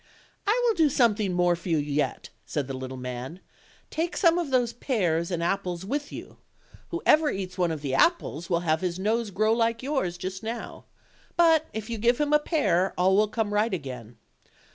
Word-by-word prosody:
"I 470 +4 +2
will 465 - +4
do 320 -6 +3
something 220 -7 +2
more 175 -1 +2
for 175 +2 -8
you 165 - +3
yet," 145 0 -2
said 145 -3 -3
the 135 - -5
little 130 0 -6
man; 125 +6 -6 0.5
"take 330 +2 -2
some 340 -2 +4
of 335 -5 -2
those 245 -3 +1
pears 175 - 0
and 170 -2 -2
apples 180 -1 -2
with 285 +7 -3
you; - - -9 0.5
whoever 320 -3 +3
eats 190 -4 -4
one 180 -2 +1
of 160 -3 -4
the 135 -2 -2
apples 175 - +1
will 170 -1 +1
have 160 -2 +1
his 180 -2 -2
nose 220 +3 0
grow 215 +3 +2
like 230 +1 0
yours 260 -12 -1
just 185 +1 -5
now; 230 +1 -6 0.5
but 325 -2 +5
if 220 0 -5
you 230 -2 -4
give 240 +2 +2
him 295 0 +1
a 300 - +6
pear 195 - +1
all 185 +2 +4
will 210 +1 +4
come 210 -1 -2
right 210 -1 +2
again. 125 -7 -8
200 Hz, 195 wpm, -26 LUFS, 170-255 Hz, 0.5 s, a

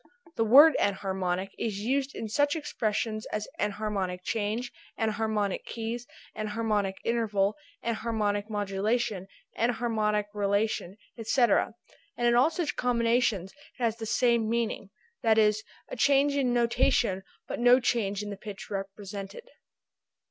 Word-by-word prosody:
This 225 - +1
word 290 +8 +9
enharmonic 190 -1 -1
is 215 -4 -2
used 270 +4 -1
in 225 - -4
such 290 +7 +1
expressions 215 -7 -2
as 215 0 -3
enharmonic 200 -3 -2
change, 220 +4 -2 0.3
enharmonic 215 -2 -1
keys, 230 +1 -5 0.3
enharmonic 210 -2 -1
interval, 215 -4 +1 0.3
enharmonic 215 -2 -1
modulation, 205 0 -1 0.3
enharmonic 220 -3 +1
relation, 200 -1 0 0.2
etc., 225 -1 +2 0.4
and 240 - 0
in 240 - +4
all 245 +6 +5
such 335 -2 -2
combinations 235 -5 +1 0.3
it 245 - -5
has 230 -1 +1
the 225 -1 -5
same 235 -1 +2
meaning, 230 -3 -1 0.3
viz. 220 -1 +4 0.3
a - - -6
change 280 +3 +3
in 265 -3 +1
notation 235 -4 +2 0.3
but - - -4
no 245 +1 +6
change 210 -5 0
in 205 - -5
the 200 - -6
pitch 205 0 -9
represented. 200 - -6
220 Hz, 125 wpm, -28 LUFS, 205-240 Hz, 0.4 s, word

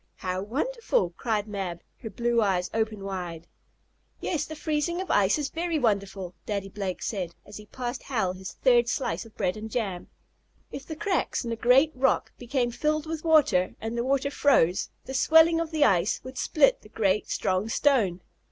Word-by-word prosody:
"How 185 0 -3
wonderful!" 270 - -1
cried 215 -3 -1
Mab, 190 -5 -4 0.2
her 225 - -6
blue 235 +3 +1
eyes 185 -3 0
open 220 -2 -1
wide. 175 -4 -5 0.7
"Yes, 305 -4 -1
the 315 - -7
freezing 310 +3 -1
of 380 - -3
ice 200 +4 +3
is 295 -2 -2
very 335 0 -1
wonderful," 200 - -1
Daddy 200 -2 -2
Blake 195 -2 -4
said, 180 -6 -3
as 205 - -10
he 210 0 -12
passed 245 +2 -5
Hal 205 -8 -1
his 190 0 -8
third 240 -2 +3
slice 255 - -2
of 225 - -17
bread 185 -3 0
and 215 +1 -7
jam. 205 -7 -3 0.6
"If 275 - -8
the 315 - -5
cracks 370 -7 -1
in 235 - -3
a - - -1
great 255 +7 +4
rock 260 +1 +1
became 245 0 -1
filled 305 +5 0
with 320 -1 -5
water, 300 - +3
and 225 +1 -4
the 235 - 0
water 275 +2 0
froze, 195 - +3 0.2
the 265 - -6
swelling 320 +5 +5
of 330 -1 -2
the 310 -2 +2
ice 185 -2 +2
would 260 0 -7
split 300 -5 +3
the 210 - -16
great, 210 -2 0
strong 190 +3 0
stone. 220 -10 +2
230 Hz, 185 wpm, -27 LUFS, 195-285 Hz, 0.7 s, swelling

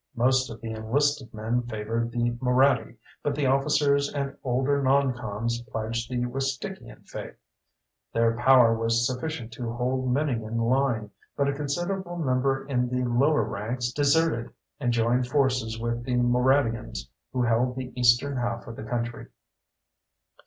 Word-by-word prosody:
Most 130 +2 +2
of 115 -1 -8
the 115 - -5
enlisted 130 +5 0
men 110 +3 -1
favored 115 0 -3
the 120 0 0
Moraddy, 125 -2 +2 0.2
but 145 -1 -1
the 145 -1 0
officers 140 +1 +2
and 140 -1 -3
older 135 +3 +1
non 135 0 +3
coms 115 0 -3
pledged 115 +1 -3
the 125 -1 -1
Wistickian 135 +10 -5
faith. - - -7 0.8
Their 115 0 +2
power 120 -1 +6
was 115 +1 +1
sufficient 130 -1 -3
to 115 -1 -4
hold 125 +2 -1
many 145 +3 +1
in 110 +1 -4
line, 115 -2 +1 0.3
but 140 - +2
a 140 - +1
considerable 175 +5 -3
number 135 -3 0
in 125 -3 0
the 125 0 -1
lower 140 +6 +3
ranks 120 +4 -3
deserted 145 -3 +2 0.3
and 125 -4 +1
joined 120 +2 +2
forces 125 -5 +1
with 120 0 -2
the 125 0 -1
Moraddians, 120 - +1 0.2
who 125 -1 0
held 120 +2 +1
the 130 -1 -6
eastern 125 +3 +3
half 120 -1 -2
of 115 - -9
the - - -6
country. 120 +1 -3
125 Hz, 150 wpm, -26 LUFS, 115-135 Hz, 0.8 s, power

